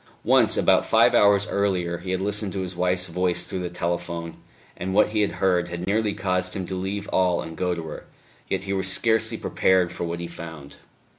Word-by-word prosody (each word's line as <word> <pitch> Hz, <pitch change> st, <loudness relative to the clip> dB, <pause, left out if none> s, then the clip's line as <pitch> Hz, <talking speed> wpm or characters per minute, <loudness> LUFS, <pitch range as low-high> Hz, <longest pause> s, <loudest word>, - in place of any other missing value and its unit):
Once, -, -, +4 dB
about -, -, +4 dB
five -, -, +4 dB
hours 100 Hz, -1 st, +5 dB
earlier, 90 Hz, -4 st, -1 dB
he 95 Hz, -, -8 dB
had 95 Hz, 0 st, 0 dB
listened 105 Hz, +1 st, -1 dB
to 95 Hz, -, -3 dB
his 90 Hz, -1 st, -5 dB
wife's 90 Hz, 0 st, 0 dB
voice 90 Hz, 0 st, 0 dB
through 95 Hz, -, -4 dB
the 90 Hz, -1 st, -3 dB
telephone, 85 Hz, -1 st, -3 dB, 0.4 s
and 95 Hz, +2 st, -4 dB
what 105 Hz, 0 st, +4 dB
he 105 Hz, -1 st, +1 dB
had 105 Hz, -, 0 dB
heard 90 Hz, -2 st, +1 dB
had 85 Hz, +1 st, -5 dB
nearly 105 Hz, +2 st, +1 dB
caused 90 Hz, 0 st, -1 dB
him 95 Hz, -2 st, -3 dB
to 95 Hz, -, -6 dB
leave 100 Hz, +2 st, -4 dB
all 90 Hz, -2 st, +2 dB
and 80 Hz, -1 st, -6 dB
go 90 Hz, +2 st, -1 dB
to 85 Hz, -, -5 dB
her. 80 Hz, -1 st, -8 dB, 0.4 s
Yet -, -, -1 dB
he 100 Hz, 0 st, -3 dB
was 95 Hz, -1 st, 0 dB
scarcely 110 Hz, +2 st, +1 dB
prepared 95 Hz, -4 st, +2 dB
for -, -, -4 dB
what 85 Hz, 0 st, -4 dB
he 85 Hz, -, -4 dB
found. 80 Hz, -4 st, -10 dB
90 Hz, 215 wpm, -24 LUFS, 85-100 Hz, 0.4 s, hours